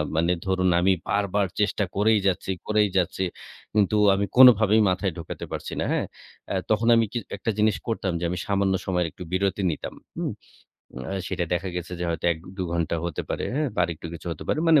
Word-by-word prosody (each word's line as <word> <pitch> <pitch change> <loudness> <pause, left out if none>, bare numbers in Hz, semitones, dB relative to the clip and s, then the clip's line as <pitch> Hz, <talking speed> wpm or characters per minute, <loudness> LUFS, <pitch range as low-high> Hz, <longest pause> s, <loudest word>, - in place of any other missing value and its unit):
মানে 85 +2 +2
ধরুন 95 -1 +2
আমি 95 +2 +4 0.2
বারবার 100 0 +1
চেষ্টা 105 0 +1
করেই 105 +2 +4
যাচ্ছি 95 0 0 0.2
করেই 105 -1 +3
যাচ্ছি, 95 +1 0 0.5
কিন্তু 105 0 +2 0.2
আমি 100 +1 +1
কোনভাবেই 110 -4 +7
মাথায় 95 +1 0
ঢোকাতে 85 - -6
পারছি - - -5
না, - - 0
হ্যা। - - +1 0.5
অ্যা - - -1
তখন 110 +2 +2
আমি 115 0 +4
কি 120 - -3 0.2
একটা 115 - -1
জিনিস 105 -1 +3
করতাম 110 -5 -1
যে, - - -5
আমি 90 - -2
সামান্য 100 -1 +2
সময়ের 90 -2 0
একটু 90 - -9
বিরতি 95 +1 0
নিতাম, 75 - -6 0.2
হুম। - - -2 0.8
অ্যা 95 - -3
সেটা 90 -2 -1
দেখা 90 +2 -2
গেছে 90 0 -5
যে, - - -1
হয়তো 85 0 -3
১-২ 90 +4 -7
ঘন্টা 85 -1 0
হতে 85 -3 -3
পারে, - - -2
হ্যাঁ, 150 +1 0
বা - - 0
আর 85 - -3
একটু 85 +2 -9
কিছু 85 - -10
হতে 80 - -6
পারে। - - +1
মানে 160 -3 +7
95 Hz, 205 wpm, -25 LUFS, 90-105 Hz, 0.8 s, কোনভাবেই